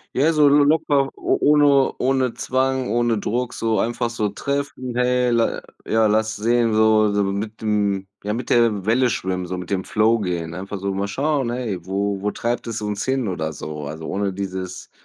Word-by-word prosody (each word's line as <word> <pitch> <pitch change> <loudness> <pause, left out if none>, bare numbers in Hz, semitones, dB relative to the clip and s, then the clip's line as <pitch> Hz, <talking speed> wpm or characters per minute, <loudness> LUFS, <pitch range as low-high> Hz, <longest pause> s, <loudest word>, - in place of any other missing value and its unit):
Ja, 150 +5 +3
so 150 -2 +4
locker, 145 -1 +3
o - - 0
ohne 145 -2 +4
ohne 130 -2 +1
Zwang, 130 +1 0
ohne 120 -1 +1
Druck, 120 +4 -2
so 110 -3 -1
einfach 120 +1 -1
so 105 -3 -1
treffen: 140 +1 -4
„Hey, 125 0 +2
la 115 -1 +1 0.2
ja, 110 0 +3
lass 110 +1 +1
sehen.“ 115 +2 +2
So 110 -1 +4
so 100 0 +1
mit 100 +3 -3
dem 100 -2 0 0.2
ja, 105 +1 -2
mit 120 +1 -4
der 110 -5 +3
Welle 120 +3 +3
schwimmen, 90 -3 -2
so 90 0 -4
mit 90 +2 -7
dem 95 -1 0
Flow 110 +1 +2
gehen. 85 -4 -3
Einfach 95 +3 -6
so 100 0 -2
mal 100 +1 -2
schauen: 135 +3 0
„Hey, 110 -8 -3
wo 100 +1 -2
wo 105 - 0
treibt 120 +2 -3
es 115 -1 -3
uns 105 -1 -2
hin“ 130 -3 0
oder 80 -4 -3
so. 75 0 -6
Also, 80 +2 -7
ohne 100 0 -1
dieses 95 -1 -6
110 Hz, 190 wpm, -21 LUFS, 100-125 Hz, 0.2 s, so